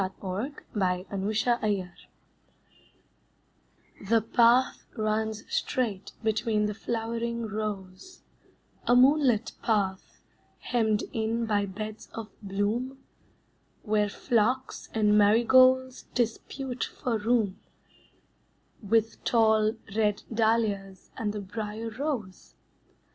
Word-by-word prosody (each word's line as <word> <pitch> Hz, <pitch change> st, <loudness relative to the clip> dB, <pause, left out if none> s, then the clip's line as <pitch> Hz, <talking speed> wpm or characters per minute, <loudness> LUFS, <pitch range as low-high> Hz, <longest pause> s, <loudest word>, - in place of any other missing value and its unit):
The 190 Hz, -, 0 dB
Fruit 205 Hz, +10 st, -4 dB, 0.2 s
Garden 190 Hz, +1 st, -1 dB
Path 210 Hz, -6 st, -1 dB, 2.0 s
The 230 Hz, 0 st, +5 dB
path 235 Hz, +3 st, +3 dB
runs 215 Hz, 0 st, -1 dB
straight 215 Hz, -7 st, -2 dB
between 220 Hz, -1 st, +1 dB
the 210 Hz, -, -1 dB
flowering 230 Hz, +1 st, -3 dB
rows, 210 Hz, -, -6 dB, 0.6 s
A 245 Hz, -, +5 dB
moonlit 255 Hz, -3 st, +4 dB
path, 195 Hz, -4 st, -1 dB, 0.4 s
hemmed 220 Hz, -3 st, 0 dB
in 225 Hz, +1 st, -1 dB
by 205 Hz, -2 st, +1 dB
beds 215 Hz, +3 st, -7 dB
of 225 Hz, -2 st, -6 dB
bloom, 210 Hz, +7 st, -2 dB, 0.9 s
Where 210 Hz, -1 st, +1 dB
phlox 245 Hz, +4 st, 0 dB
and 210 Hz, -1 st, +3 dB
marigolds 255 Hz, +4 st, +4 dB
dispute 250 Hz, +2 st, -2 dB
for 235 Hz, -3 st, -2 dB
room 215 Hz, -3 st, +1 dB, 1.2 s
With 225 Hz, +1 st, 0 dB
tall, 220 Hz, -1 st, +3 dB, 0.2 s
red 210 Hz, -2 st, +1 dB
dahlias 215 Hz, -4 st, 0 dB
and 210 Hz, -2 st, -2 dB
the 210 Hz, 0 st, -5 dB
briar 215 Hz, +3 st, -5 dB
rose. 240 Hz, -7 st, -5 dB
220 Hz, 95 wpm, -28 LUFS, 205-235 Hz, 2.0 s, The